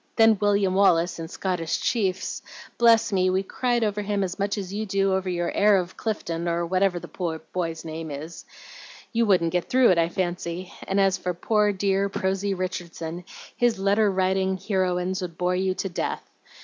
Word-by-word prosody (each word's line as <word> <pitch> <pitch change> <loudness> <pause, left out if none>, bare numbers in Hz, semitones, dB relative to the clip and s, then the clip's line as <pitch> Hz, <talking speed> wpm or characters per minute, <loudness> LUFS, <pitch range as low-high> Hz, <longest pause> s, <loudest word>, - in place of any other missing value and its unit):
Then 225 -3 +5
William 200 -2 +2
Wallace 175 -3 +3
in 165 - -5
'Scottish 170 -2 -2
Chiefs.' 195 -6 -1 0.4
Bless 230 -2 +5
me! 185 -1 +3
we 190 +1 +1
cried 240 +3 0
over 210 -1 0
him 205 -1 -1
as 185 +1 -4
much 200 +1 -1
as 195 -1 -5
you 210 +2 -2
do 195 0 +1
over 190 0 -1
your 175 -1 -1
'Heir 205 -1 +4
of 180 -1 -3
Clifton,' 170 -6 -3
or 170 0 0
whatever 185 0 +1
the 170 -2 -4
boy's 165 -3 -3
name 160 0 -5
is. 150 +4 -7 0.7
You 230 0 +2
wouldn't 175 -4 +3
get 180 -1 -1
through 255 -3 +5
it, 175 - +3
I 165 0 +2
fancy; 175 -1 -3
and 195 +1 +1
as 195 -1 +3
for 180 -1 -3
poor, 210 +3 +2
dear, 195 0 0
prosy 195 +1 -1
Richardson, 175 -2 -5 0.3
his 240 -3 +2
letter 200 +2 +3
writing 190 0 +1
heroines 185 -1 -1
would 170 -2 -6
bore 180 0 +1
you 185 0 0
to 195 - -2
death. 175 - -3
190 Hz, 185 wpm, -25 LUFS, 175-200 Hz, 0.7 s, Then